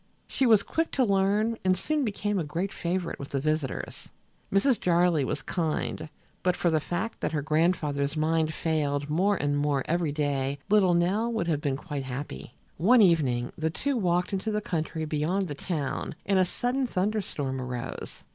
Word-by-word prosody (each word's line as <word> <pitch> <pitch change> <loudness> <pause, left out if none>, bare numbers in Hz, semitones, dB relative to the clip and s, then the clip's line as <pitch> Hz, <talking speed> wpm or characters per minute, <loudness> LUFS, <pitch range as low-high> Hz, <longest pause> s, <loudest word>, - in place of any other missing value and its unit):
She 265 - +1
was 220 -3 +6
quick 325 0 -1
to 265 - +3
learn 205 +2 +2
and 185 0 +3
soon 305 +8 0
became 205 -3 -1
a - - 0
great 170 +6 -3
favorite 175 0 -2
with 140 - -7
the 140 - -1
visitors. 155 -1 -3 0.4
Mrs. 225 +6 +3
Jarley 175 -3 +3
was 135 +1 -3
kind, 160 -1 -2
and - - -7 0.3
but 180 -1 +2
for 175 - +1
the 160 - +3
fact 175 +8 -3
that - - -2
her 150 -2 -1
grandfather's 155 -2 +1
mind 160 0 +1
failed 145 -3 -1
more 195 +6 +2
and 145 -1 0
more 145 -1 +1
every 170 -2 +1
day 140 -2 -1
little 190 -4 +5
Nell 200 +7 +1
would 225 -7 -1
have 155 -3 0
been 140 -2 -1
quite 145 -2 -5
happy. 125 - -6 0.2
One 220 - +6
evening 135 -9 +2
the 160 0 -1
two 275 - -1
walked 180 -3 +1
into 195 +3 -1
the 210 0 0
country 160 -4 -3
beyond 160 +6 0
the 150 - -4
town 150 -1 -3
and 195 -1 +3
a 185 - +5
sudden 250 +7 -1
thunder 210 +1 0
storm 135 -7 -3
arose. 125 -1 -6
170 Hz, 185 wpm, -27 LUFS, 145-195 Hz, 0.4 s, was